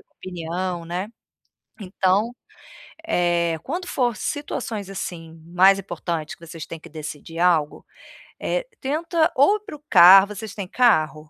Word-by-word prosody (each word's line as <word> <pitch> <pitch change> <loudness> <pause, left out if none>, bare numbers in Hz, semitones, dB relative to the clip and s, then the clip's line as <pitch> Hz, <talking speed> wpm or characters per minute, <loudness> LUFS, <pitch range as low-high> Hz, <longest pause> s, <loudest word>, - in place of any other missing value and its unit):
opinião, 175 0 -5
né. 180 +5 -4 0.7
Então, 195 +3 +1 0.8
eh, 170 - +1
quando 350 +6 -4
for 245 -3 0
situações, 230 -9 -4
assim, 165 -4 -7
mais 190 +3 +5
importante 170 -3 -5
que 170 - -14
vocês 165 -1 -8
têm 165 - -8
que 170 - -13
decidir 155 +1 -8
algo, 165 -4 +1 0.6
eh, - - -2 0.2
tenta 320 +3 0
ou 285 +11 +5
ir - - -21
pro 300 -8 -10
carro 190 +3 +9
vocês 210 0 -8
têm 200 -3 -5
carro? 205 -10 +3
185 Hz, 135 wpm, -22 LUFS, 170-235 Hz, 0.8 s, carro